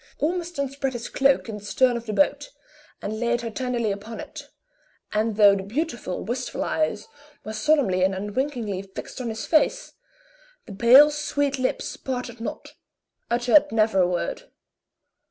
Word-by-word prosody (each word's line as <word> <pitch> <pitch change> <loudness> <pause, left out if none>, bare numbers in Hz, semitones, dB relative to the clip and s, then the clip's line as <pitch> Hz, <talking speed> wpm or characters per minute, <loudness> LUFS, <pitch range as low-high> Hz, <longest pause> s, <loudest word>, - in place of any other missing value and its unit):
Ormiston 340 -2 -2
spread 270 0 -3
his 240 -1 -5
cloak 275 -1 +2
in 220 -2 -5
the - - -17
stern 250 +4 +2
of 235 0 -6
the 215 - -2
boat, 290 - +1 0.5
and 215 +1 -4
laid 240 0 0
her 230 -1 -5
tenderly 240 -2 -1
upon 210 +3 -7
it, - - -9 0.6
and 215 +1 0
though 205 -2 +7
the 195 - -3
beautiful, 240 - -3
wistful 250 +5 -3
eyes 310 +1 -1 0.4
were 215 - -6
solemnly 235 -10 +2
and 190 +1 +2
unwinkingly 210 0 -3
fixed 195 +6 -8
on 240 - -3
his 220 -1 -5
face, - - +1 0.7
the 210 - -9
pale, 255 +8 +7
sweet 285 -2 -1
lips 255 - -2
parted 245 -3 -5
not - - -6 0.6
uttered 245 +5 +4
never 220 -3 +2
a 180 - +4
word. 175 -1 -3
240 Hz, 155 wpm, -24 LUFS, 210-275 Hz, 0.7 s, though